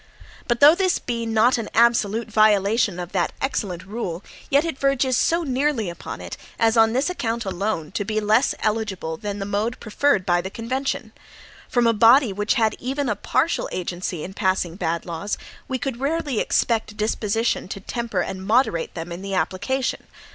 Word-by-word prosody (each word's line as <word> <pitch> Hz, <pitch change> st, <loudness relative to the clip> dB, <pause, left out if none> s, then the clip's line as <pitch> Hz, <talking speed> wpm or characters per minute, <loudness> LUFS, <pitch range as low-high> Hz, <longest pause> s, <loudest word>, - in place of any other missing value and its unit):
But 240 Hz, -1 st, 0 dB
though 295 Hz, +2 st, +9 dB
this 370 Hz, 0 st, +1 dB
be 235 Hz, -1 st, -3 dB
not 225 Hz, +3 st, +3 dB
an 225 Hz, -, -5 dB
absolute 230 Hz, -1 st, +3 dB
violation 210 Hz, -2 st, +3 dB
of 175 Hz, 0 st, -6 dB
that 180 Hz, -3 st, 0 dB
excellent 190 Hz, -9 st, -2 dB
rule, 195 Hz, -4 st, -5 dB, 0.3 s
yet 285 Hz, +3 st, +3 dB
it 325 Hz, -5 st, -4 dB
verges 275 Hz, -2 st, +2 dB
so 335 Hz, +7 st, +2 dB
nearly 265 Hz, -, 0 dB
upon 170 Hz, -, -8 dB
it, -, -, -7 dB, 0.2 s
as 225 Hz, 0 st, +3 dB
on 225 Hz, -1 st, +5 dB
this 260 Hz, +4 st, +1 dB
account 235 Hz, -, -2 dB
alone 190 Hz, -4 st, -2 dB
to 205 Hz, -, -2 dB
be 215 Hz, +1 st, -1 dB
less 215 Hz, +5 st, +2 dB
eligible 210 Hz, -7 st, -1 dB
than 205 Hz, +4 st, -5 dB
the 195 Hz, -, -4 dB
mode 210 Hz, +4 st, -2 dB
preferred 215 Hz, -2 st, +1 dB
by 175 Hz, -2 st, +2 dB
the 190 Hz, -, -5 dB
convention. 255 Hz, +2 st, -3 dB, 0.6 s
From 245 Hz, -2 st, +2 dB
a 230 Hz, -, +4 dB
body 230 Hz, +1 st, +5 dB
which 210 Hz, +2 st, 0 dB
had 220 Hz, -2 st, +2 dB
even 270 Hz, +1 st, -2 dB
a 210 Hz, -, 0 dB
partial 265 Hz, +10 st, 0 dB
agency 175 Hz, -2 st, -4 dB
in 190 Hz, -, -7 dB
passing 185 Hz, -4 st, 0 dB
bad 170 Hz, -3 st, -2 dB
laws, 170 Hz, +4 st, -3 dB, 0.3 s
we 260 Hz, -, -2 dB
could 255 Hz, -2 st, -4 dB
rarely 285 Hz, -3 st, -1 dB
expect 225 Hz, -2 st, +1 dB
a -, -, -21 dB
disposition 220 Hz, +1 st, -1 dB
to 195 Hz, -, -6 dB
temper 230 Hz, -2 st, -3 dB
and 190 Hz, +1 st, -5 dB
moderate 210 Hz, -7 st, +1 dB
them 165 Hz, 0 st, -6 dB
in 170 Hz, +2 st, -6 dB
the 195 Hz, 0 st, -3 dB
application. 220 Hz, +9 st, -1 dB
220 Hz, 185 wpm, -23 LUFS, 190-250 Hz, 0.6 s, though